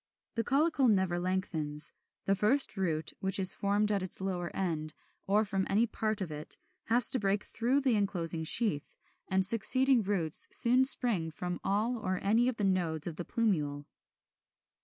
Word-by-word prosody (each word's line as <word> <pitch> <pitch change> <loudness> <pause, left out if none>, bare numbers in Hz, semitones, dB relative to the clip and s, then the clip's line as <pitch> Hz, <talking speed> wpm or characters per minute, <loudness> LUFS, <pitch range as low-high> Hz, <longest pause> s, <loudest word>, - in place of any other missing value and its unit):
The 230 - -3
caulicle 280 +1 0
never 190 -5 0
lengthens: 165 -5 -1 0.3
the 195 - +1
first 215 +8 +2
root, 160 -5 -3
which 190 0 -1
is 190 -1 +4
formed 205 +1 -1
at 200 -2 -1
its 185 - -5
lower 180 -2 -4
end, 155 -5 -4 0.3
or 210 +3 +1
from 195 -2 -3
any 215 +4 +1
part 215 -2 -4
of 175 -4 -5
it, 150 0 -6 0.3
has 235 0 +7
to 260 - -1
break 200 0 -2
through 250 +5 -2
the 260 -4 0
enclosing 175 -5 -2
sheath; 160 -3 +2 0.3
and 190 -1 0
succeeding 250 +4 +4
roots 185 -6 +1
soon 250 +2 +5
spring 225 -11 +3
from 180 +3 -6
all 220 +5 -2
or 185 -3 -3
any 225 +5 +1
of 255 - -2
the 210 - -5
nodes 175 -5 0
of 165 -3 -5
the 175 - -6
plumule. 150 - -3
195 Hz, 170 wpm, -29 LUFS, 175-230 Hz, 0.3 s, has